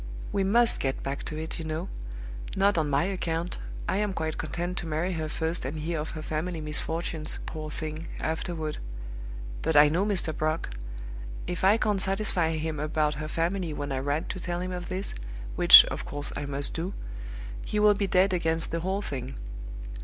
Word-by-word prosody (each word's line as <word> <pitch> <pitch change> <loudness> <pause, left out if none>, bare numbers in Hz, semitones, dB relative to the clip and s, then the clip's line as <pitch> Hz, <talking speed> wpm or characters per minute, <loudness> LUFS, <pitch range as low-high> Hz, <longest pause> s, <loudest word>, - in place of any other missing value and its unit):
We 200 - +1
must 230 +5 +5
get 135 -1 -1
back 140 +1 -3
to 155 - -2
it, 160 +1 -4
you - - -3
know. 160 +3 -3 0.7
Not 200 +1 +4
on 150 -2 0
my 140 +3 +3
account; 175 -2 -2 0.3
I - - +1
am 205 -1 0
quite 160 -3 -2
content 175 +3 -2
to 170 - -5
marry 160 +4 0
her 160 -2 -2
first 160 +2 -1
and 140 +4 -3
hear 160 +1 -2
of 150 - -3
her 155 - -5
family 160 +3 -2
misfortunes, 155 +1 +2
poor 155 -1 -5
thing, 155 +1 -5
afterward. 160 -1 -2 0.8
But 160 0 0
I 145 0 +9
know 170 +5 +2
Mr. 190 -7 +1
Brock. 155 - -1 0.7
If 180 0 -3
I 200 +3 +6
can't 210 -3 +1
satisfy 195 -4 +1
him 155 -1 -2
about 150 0 +1
her 155 - -3
family 170 +1 -1
when 145 -1 -4
I 135 - 0
write 145 +3 -1
to - - -3
tell 175 -1 -2
him 185 +1 -3
of 180 -1 -5
this 190 +2 -2 0.4
(which, - - +11
of - - -4
course, 145 0 -4
I 145 - -3
must 140 0 0
do), 175 +4 -3 0.7
he 210 - -1
will 210 0 +7
be 200 0 0
dead 185 +1 +4
against 165 -2 0
the 165 - 0
whole 190 +4 -1
thing. 130 -4 -4
165 Hz, 190 wpm, -28 LUFS, 155-185 Hz, 0.8 s, which